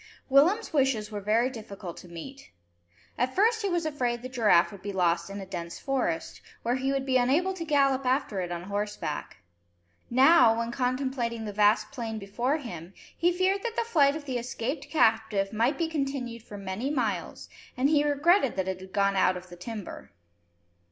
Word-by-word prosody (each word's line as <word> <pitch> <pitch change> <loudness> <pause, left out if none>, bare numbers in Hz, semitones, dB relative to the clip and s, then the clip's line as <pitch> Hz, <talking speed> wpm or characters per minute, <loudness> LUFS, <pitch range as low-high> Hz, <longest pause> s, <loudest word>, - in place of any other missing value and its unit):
Willem's 330 +12 +4
wishes 260 -7 +1
were 205 -1 -4
very 220 +5 +2
difficult 200 -7 -8
to - - -11
meet. 175 +12 -10 0.7
At 255 +1 0
first 445 +3 +3
he 400 - 0
was 345 -2 0
afraid 245 -6 -1
the 255 - -5
giraffe 215 -9 +4
would 200 -2 -11
be 200 +1 -4
lost 175 -2 +1
in 200 +1 -6
a 195 - -6
dense 170 -3 -6
forest, 250 -12 -2 0.2
where 235 - +1
he 265 +1 -1
would 270 -1 -1
be 260 -1 +3
unable 295 +10 +2
to 360 -3 -5
gallop 275 -4 +2
after 255 -6 0
it 175 -1 -3
on 175 0 -4
horseback. 205 +2 -4 0.7
Now, 260 -2 +6
when 230 0 -2
contemplating 250 -2 -2
the 210 - -5
vast 210 +1 +3
plain 230 -5 -4
before 235 +8 -1
him, 185 - -8 0.2
he 345 +2 +2
feared 375 +2 +1
that 460 +1 -4
the 470 - +1
flight 295 -11 +3
of 310 -2 -7
the 255 -3 -2
escaped 260 +4 -4
captive 220 -8 +2
might 235 +6 +1
be 335 - 0
continued 275 -6 -3
for 210 -2 -10
many 200 +6 -3
miles, 210 - -2 0.3
and 260 +2 +3
he 295 0 +3
regretted 295 - +3
that 190 -1 -1
it 190 -1 -3
had 190 0 -12
gone 200 -1 +2
out 185 -1 +3
of 180 0 -11
the 175 - -10
timber. 210 +2 -8
240 Hz, 190 wpm, -28 LUFS, 200-280 Hz, 0.7 s, Now